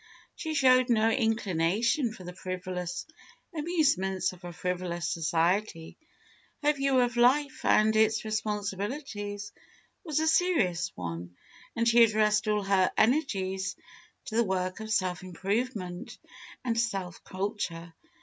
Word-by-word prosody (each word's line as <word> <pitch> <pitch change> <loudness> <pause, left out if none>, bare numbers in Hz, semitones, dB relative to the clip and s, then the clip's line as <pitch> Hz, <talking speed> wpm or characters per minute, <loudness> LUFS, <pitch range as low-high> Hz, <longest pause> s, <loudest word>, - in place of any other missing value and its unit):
She 315 -1 -4
showed 255 -2 +5
no 225 -1 +3
inclination 225 - +1
for 190 - -11
the 180 0 -7
frivolous 180 -1 -5 0.5
amusements 275 - +1
of 180 0 -16
a 175 - -6
frivolous 175 0 -3
society. 165 +2 0 0.7
Her 295 +1 +4
view 275 -2 +2
of 245 -1 0
life 265 +4 +3
and 215 +1 +4
its 220 +1 +3
responsibilities 205 0 -3 0.5
was 310 -5 -1
a 315 - +1
serious 245 - +2
one, 85 0 -6 0.4
and 230 0 +1
she 235 0 +7
addressed 215 -1 +3
all 210 -1 +1
her 195 -1 +3
energies 195 -7 +1 0.5
to 220 - -6
the 235 - +5
work 185 -1 -2
of 220 0 -7
self 185 -4 0
improvement 190 0 -3 0.5
and 230 -2 0
self 195 -7 -2
culture. 185 -4 -4
205 Hz, 125 wpm, -29 LUFS, 185-235 Hz, 0.7 s, she